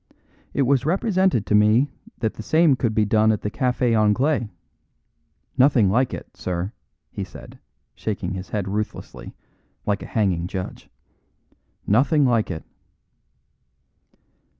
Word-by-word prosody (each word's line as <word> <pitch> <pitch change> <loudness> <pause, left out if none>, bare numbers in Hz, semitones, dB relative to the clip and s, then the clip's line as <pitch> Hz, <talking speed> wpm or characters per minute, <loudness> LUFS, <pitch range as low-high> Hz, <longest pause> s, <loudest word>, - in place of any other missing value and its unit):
"It 140 - +3
was 135 -1 +2
represented 185 - +1
to - - -1
me 110 +7 +4 0.3
that 110 -2 0
the - - -8
same 155 +4 +4
could 120 -4 -1
be 110 - +3
done 110 +1 +3
at 105 - -1
the 105 - -2
Café 125 -2 +1
Anglais. 110 +4 +2 1.1
Nothing 125 -7 +5
like 125 +4 +2
it, - - -8
sir," 90 +2 -3 0.4
he - - -4
said, - - -12 0.3
shaking - - -4
his 95 0 -6
head 100 -3 -2
ruthlessly, 100 - -5 0.5
like 100 -1 0
a - - -7
hanging 90 -6 0
judge. 95 -1 -6 1.0
"Nothing 140 +7 +3
like 115 -4 +2
it." 80 -4 -5
110 Hz, 130 wpm, -23 LUFS, 105-130 Hz, 1.1 s, Nothing